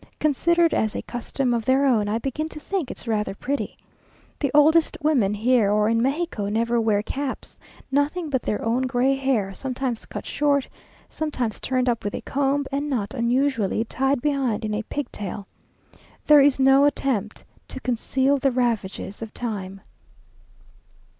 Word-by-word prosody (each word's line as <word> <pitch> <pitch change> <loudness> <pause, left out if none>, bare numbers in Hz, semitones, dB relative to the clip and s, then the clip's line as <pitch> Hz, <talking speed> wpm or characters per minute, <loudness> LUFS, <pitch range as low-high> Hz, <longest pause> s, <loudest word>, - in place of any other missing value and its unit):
Considered 335 +3 +2
as 220 -1 0
a - - -3
costume 245 +1 -2
of 230 -2 -1
their 265 +2 +3
own, 220 -6 +2
I 215 - 0
begin 275 +6 -3
to 305 - -9
think 360 -3 -3
it - - -8
rather 210 -3 -1
pretty. 250 -1 -3 0.6
The 280 - 0
oldest 310 +3 +4
women 245 -10 +2
here 225 -1 +3
or 210 +1 +3
in 230 0 +2
Mexico 270 -6 -1
never 230 +2 +1
wear 210 -2 +1
caps; 275 +3 -5 0.3
nothing 295 +5 0
but 265 -4 -1
their 210 - -2
own 245 +3 +1
gray 255 +2 +2
hair, 255 -8 0
sometimes 255 0 -4
cut - - -7
short, 285 -2 +1 0.4
sometimes 255 -8 -3
turned 255 -1 0
up 235 -2 0
with 205 - -3
a - - -5
comb, 280 +1 0
and 285 +2 -2
not 220 -6 -2
unusually 235 -3 +1
tied 270 +2 0
behind 265 -7 0
in 215 - -2
a 210 - -1
pigtail. 210 -6 -5 0.8
There 300 -1 +7
is 275 -1 +4
no 270 +1 +6
attempt 260 -7 -1 0.2
to - - -7
conceal 260 +3 0
the 275 - +2
ravages 230 -5 -2
of 225 -1 -7
time.... 195 -5 -5
255 Hz, 160 wpm, -24 LUFS, 220-280 Hz, 0.8 s, There